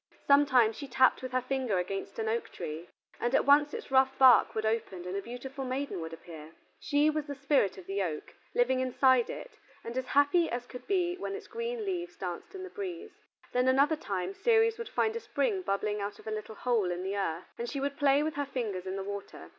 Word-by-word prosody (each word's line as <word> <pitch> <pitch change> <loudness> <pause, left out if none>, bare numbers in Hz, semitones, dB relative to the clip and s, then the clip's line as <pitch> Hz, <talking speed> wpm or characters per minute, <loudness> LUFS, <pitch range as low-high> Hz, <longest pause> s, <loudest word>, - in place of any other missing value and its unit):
Sometimes 260 -6 +5
she 285 - -7
tapped 260 0 +4
with 255 0 -5
her 255 -1 0
finger 255 -6 -1
against 195 +2 -3
an 220 - -2
oak 230 +2 -1
tree, 155 +3 -6 0.3
and 240 +2 +1
at - - +3
once 290 +1 +5
its - - -7
rough 265 0 +4
bark 260 -2 +6
would 220 0 -1
open 220 -5 -2
and 180 +1 -4
a 200 - -1
beautiful 255 +5 -7
maiden 260 -6 -3
would 160 0 -5
appear: 160 -1 -10 0.3
she 290 0 +2
was 305 -1 -3
the 285 - -5
spirit 275 -8 +1
of 185 - -10
the 195 +2 -2
oak, 160 -5 -4 0.2
living 255 +1 +3
inside 260 -1 +3
it, - - -8 0.2
and 235 +1 -6
as 260 0 -2
happy 285 +6 +3
as 240 0 -3
could 250 0 -10
be 360 -3 +1
when 390 +1 -4
its 420 - -8
green 465 -1 -4
leaves 355 -2 -3
danced 180 - -6
in 380 - -6
the 375 - -7
breeze. 390 +1 -7 0.3
Then 250 +1 +2
another 280 +4 +4
time 190 - -3
Ceres 455 - +3
would 465 - -5
find 440 0 0
a - - -1
spring 445 -3 -1
bubbling 210 - -1
out 200 0 -4
of - - -16
a 220 - -4
little 215 0 -5
hole 225 -5 +1
in 175 +1 -3
the 195 +2 -2
earth, 175 -3 -3
and 235 0 -3
she 280 - -3
would 280 +1 -2
play 285 0 +4
with 310 0 -1
her 285 - 0
fingers 210 -9 -3
in 190 - -3
the 195 - -3
water. 200 0 -7
255 Hz, 230 wpm, -30 LUFS, 200-290 Hz, 0.3 s, bark